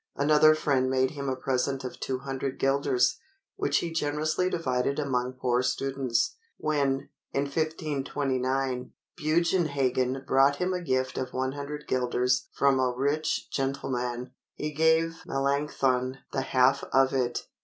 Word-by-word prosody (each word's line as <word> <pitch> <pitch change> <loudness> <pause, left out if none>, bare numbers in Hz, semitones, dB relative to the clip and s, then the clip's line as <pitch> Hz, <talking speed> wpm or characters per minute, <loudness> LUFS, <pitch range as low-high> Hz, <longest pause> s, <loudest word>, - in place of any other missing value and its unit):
Another 150 +2 +5
friend 135 -4 +1
made 130 0 +2
him 140 -2 -4
a 130 - 0
present 135 +1 -1
of 125 - -6
200 135 0 -3
guilders, 135 -2 +2 0.4
which 405 +1 +1
he 170 - -2
generously 155 +3 0
divided 140 -5 0
among 130 -4 -1
poor 125 -1 +1
students. 135 - 0 0.2
When, 140 -3 0 0.2
in 140 - +1
1529, 135 -4 -1 0.2
Bugenhagen 145 -6 +1
brought 135 +1 +4
him 180 +5 -1
a 180 - -2
gift 130 -5 -1
of 130 -1 -4
100 140 +3 -3
guilders 125 0 +1
from 140 -1 +3
a 130 -1 +2
rich 140 +5 -1
gentleman, 125 -2 -2 0.2
he 150 - -3
gave 160 +1 +2
Melanchthon 135 -2 0 0.2
the 135 - 0
half 130 0 +3
of 135 0 +4
it. 125 -2 -1
135 Hz, 130 wpm, -28 LUFS, 130-150 Hz, 0.4 s, Another